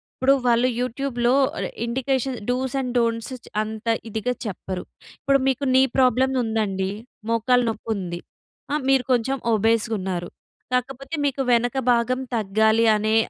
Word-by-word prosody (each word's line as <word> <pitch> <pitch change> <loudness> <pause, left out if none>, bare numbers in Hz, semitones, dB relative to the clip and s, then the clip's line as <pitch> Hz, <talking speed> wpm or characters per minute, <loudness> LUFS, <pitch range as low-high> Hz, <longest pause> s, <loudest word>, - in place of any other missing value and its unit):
ఇప్పుడు 270 +2 +4
వాళ్ళు 240 +1 +4
యూట్యూబ్‌లో 250 -1 0 0.3
ఆహ్, - - -2 0.2
ఇండికేషన్ 260 +1 -1
డూస్ 255 +1 -1
అండ్ 250 -2 -2
డోంట్స్ 230 +2 -1
చ్ - - -16
అంత 220 +1 -6 0.2
ఇదిగా 220 +4 -1
చెప్పరు. 185 -2 -5 0.4
ఇప్పుడు 275 -1 +3
మీకు 270 +1 0
నీ 260 - +7
ప్రాబ్లమ్ 260 +1 +3
ఉందండి. 205 -4 -1 0.4
మోకాలు 245 +2 +3
నొప్పి 225 +1 -6
ఉంది. 175 -3 -4 0.5
ఆహ్, 300 -3 0
మీరు 270 -2 +4
కొంచెం 255 +3 0 0.2
ఒబేస్‌గా 225 +1 +2
ఉన్నారు. 180 -2 -3 0.4
కాకపోతే 270 +4 -2
మీకు 275 -1 0
వెనక 240 +2 +1 0.2
భాగం 245 +2 +1 0.2
తగ్గాలి 220 +2 +3
అనే 215 +1 +1
235 Hz, 140 wpm, -23 LUFS, 220-260 Hz, 0.5 s, నీ